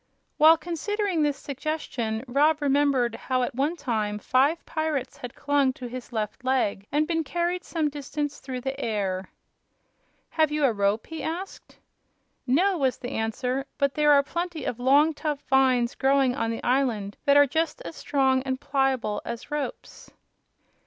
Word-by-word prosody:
While 320 Hz, +2 st, +7 dB
considering 360 Hz, +2 st, -2 dB
this 290 Hz, -2 st, +1 dB
suggestion 265 Hz, -6 st, -3 dB
Rob 295 Hz, +5 st, +3 dB
remembered 280 Hz, -4 st, +2 dB
how 255 Hz, +2 st, -1 dB
at -, -, -2 dB
one 285 Hz, +7 st, 0 dB
time 215 Hz, -9 st, -2 dB
five 270 Hz, +9 st, +1 dB
pirates 315 Hz, -4 st, -2 dB
had 245 Hz, -1 st, -8 dB
clung 285 Hz, -2 st, +1 dB
to 255 Hz, -, -9 dB
his 245 Hz, +1 st, -7 dB
left 220 Hz, +2 st, -4 dB
leg 245 Hz, -6 st, 0 dB
and 300 Hz, +2 st, +2 dB
been 325 Hz, -1 st, 0 dB
carried 345 Hz, +4 st, -2 dB
some 320 Hz, -3 st, -1 dB
distance 290 Hz, 0 st, -4 dB
through 260 Hz, -2 st, -6 dB
the 270 Hz, +2 st, -4 dB
air. 195 Hz, -4 st, -2 dB, 1.0 s
"Have 315 Hz, -2 st, +2 dB
you 300 Hz, -1 st, +2 dB
a 245 Hz, -, +3 dB
rope?" 200 Hz, +1 st, 0 dB
he 320 Hz, -1 st, -7 dB
asked. 355 Hz, +4 st, -6 dB, 0.7 s
"No," 355 Hz, +8 st, +2 dB
was 265 Hz, -2 st, +1 dB
the 245 Hz, -, -6 dB
answer; 250 Hz, +4 st, -2 dB
"but 280 Hz, -2 st, +1 dB
there 300 Hz, -1 st, +3 dB
are 280 Hz, 0 st, +5 dB
plenty 340 Hz, -1 st, -4 dB
of 245 Hz, -, -3 dB
long, 285 Hz, +5 st, +4 dB
tough 295 Hz, -2 st, -3 dB
vines 260 Hz, -3 st, +3 dB
growing 270 Hz, -1 st, +2 dB
on 230 Hz, -4 st, -1 dB
the 225 Hz, -, -4 dB
island 240 Hz, -6 st, 0 dB
that 280 Hz, 0 st, +5 dB
are 285 Hz, -, +8 dB
just 320 Hz, -, -1 dB
as 330 Hz, -, -7 dB
strong 265 Hz, -2 st, +1 dB
and 260 Hz, 0 st, -3 dB
pliable 265 Hz, -7 st, 0 dB
as 235 Hz, +4 st, -7 dB
ropes." 295 Hz, -1 st, -5 dB
275 Hz, 165 wpm, -26 LUFS, 245-305 Hz, 1.0 s, are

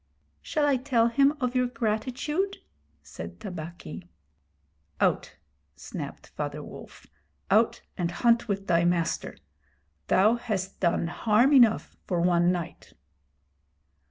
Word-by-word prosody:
'Shall 300 Hz, -2 st, 0 dB
I 280 Hz, -2 st, +3 dB
tell 245 Hz, -3 st, +2 dB
him 280 Hz, +4 st, +3 dB
of 250 Hz, -2 st, -1 dB
your 250 Hz, 0 st, +3 dB
gratitude?' 250 Hz, -, -2 dB, 0.5 s
said 80 Hz, +3 st, -9 dB
Tabaqui. 175 Hz, 0 st, -8 dB, 0.9 s
'Out!' -, -, +1 dB, 0.4 s
snapped -, -, -7 dB
Father -, -, -5 dB
Wolf. -, -, -12 dB, 0.5 s
'Out 220 Hz, +3 st, +3 dB, 0.2 s
and 170 Hz, -1 st, 0 dB
hunt 235 Hz, +6 st, +2 dB
with 200 Hz, -2 st, -2 dB
thy 170 Hz, -3 st, +3 dB
master. 175 Hz, -1 st, 0 dB, 0.7 s
Thou 215 Hz, +5 st, +4 dB
hast 200 Hz, -6 st, -4 dB
done 170 Hz, -2 st, +1 dB
harm 220 Hz, -, +3 dB
enough 240 Hz, -5 st, +4 dB
for 180 Hz, -3 st, 0 dB
one 175 Hz, 0 st, +3 dB
night.' 175 Hz, -3 st, -5 dB
215 Hz, 115 wpm, -27 LUFS, 175-245 Hz, 0.9 s, Thou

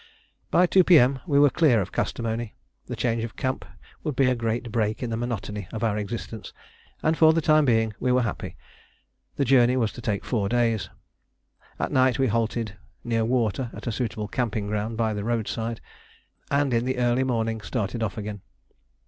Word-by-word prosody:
By 180 Hz, -, +5 dB
2 185 Hz, +1 st, +5 dB
P.M. 140 Hz, -7 st, +5 dB
we 145 Hz, -3 st, +2 dB
were 145 Hz, -1 st, +6 dB
clear 150 Hz, -10 st, +4 dB
of 95 Hz, -, -3 dB
Kastamoni. 115 Hz, -1 st, -2 dB, 0.3 s
The -, -, -4 dB
change 115 Hz, -2 st, 0 dB
of 115 Hz, -, -6 dB
camp 130 Hz, 0 st, -2 dB, 0.4 s
would 150 Hz, -4 st, -2 dB
be 135 Hz, -, +3 dB
a -, -, +1 dB
great 115 Hz, 0 st, -2 dB
break 110 Hz, +1 st, -1 dB
in 120 Hz, -, -3 dB
the -, -, 0 dB
monotony 105 Hz, -4 st, -4 dB
of 110 Hz, -, -4 dB
our 110 Hz, -2 st, +1 dB
existence, 110 Hz, +1 st, -5 dB, 0.5 s
and 155 Hz, +1 st, +3 dB
for 160 Hz, 0 st, +6 dB
the 165 Hz, -, +2 dB
time 155 Hz, -1 st, +4 dB
being 115 Hz, -3 st, +2 dB
we 125 Hz, -, +1 dB
were 125 Hz, 0 st, +3 dB
happy. 115 Hz, -, -4 dB, 0.8 s
The 140 Hz, -, +1 dB
journey 125 Hz, -1 st, +4 dB
was 115 Hz, -4 st, +1 dB
to 120 Hz, -, -10 dB
take 105 Hz, -3 st, -2 dB
four 105 Hz, -5 st, 0 dB
days. 115 Hz, -3 st, +1 dB, 0.9 s
At -, -, -2 dB
night 130 Hz, -1 st, +3 dB
we 135 Hz, -, +2 dB
halted 115 Hz, -2 st, -1 dB, 0.3 s
near 115 Hz, -1 st, 0 dB
water 120 Hz, 0 st, 0 dB
at -, -, -9 dB
a 120 Hz, -, -1 dB
suitable 110 Hz, -2 st, -3 dB
camping 110 Hz, -2 st, -2 dB
ground 105 Hz, +2 st, -2 dB
by 110 Hz, -2 st, +1 dB
the 105 Hz, -1 st, -3 dB
roadside, 115 Hz, 0 st, -2 dB, 0.7 s
and 140 Hz, -2 st, +1 dB
in 115 Hz, +1 st, +1 dB
the 130 Hz, 0 st, -1 dB
early 120 Hz, +1 st, +2 dB
morning 115 Hz, -3 st, -1 dB
started 110 Hz, -1 st, -3 dB
off 110 Hz, -1 st, -2 dB
again. 105 Hz, -2 st, -5 dB
115 Hz, 190 wpm, -25 LUFS, 110-130 Hz, 0.9 s, were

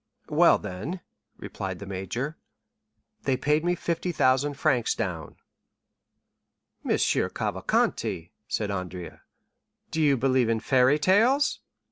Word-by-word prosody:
"Well, -, -, +5 dB
then," 140 Hz, -, -6 dB, 0.4 s
replied 95 Hz, -1 st, -6 dB
the 100 Hz, -, -8 dB
major, 100 Hz, -, -4 dB, 0.9 s
"they 135 Hz, -2 st, 0 dB
paid 150 Hz, +4 st, +1 dB
me 175 Hz, +1 st, +1 dB
50,000 145 Hz, -5 st, 0 dB
francs 125 Hz, -4 st, +1 dB
down." 85 Hz, -9 st, -4 dB, 1.5 s
"Monsieur -, -, +1 dB
Cavalcanti," 85 Hz, -2 st, -1 dB, 0.2 s
said 105 Hz, -2 st, -2 dB
Andrea, 90 Hz, -2 st, -6 dB, 0.7 s
"do 160 Hz, -, -1 dB
you 145 Hz, -3 st, +4 dB
believe 130 Hz, -1 st, +2 dB
in 115 Hz, -1 st, +1 dB
fairy 130 Hz, +4 st, +3 dB
tales?" 230 Hz, -, +3 dB
130 Hz, 105 wpm, -26 LUFS, 100-150 Hz, 1.5 s, Well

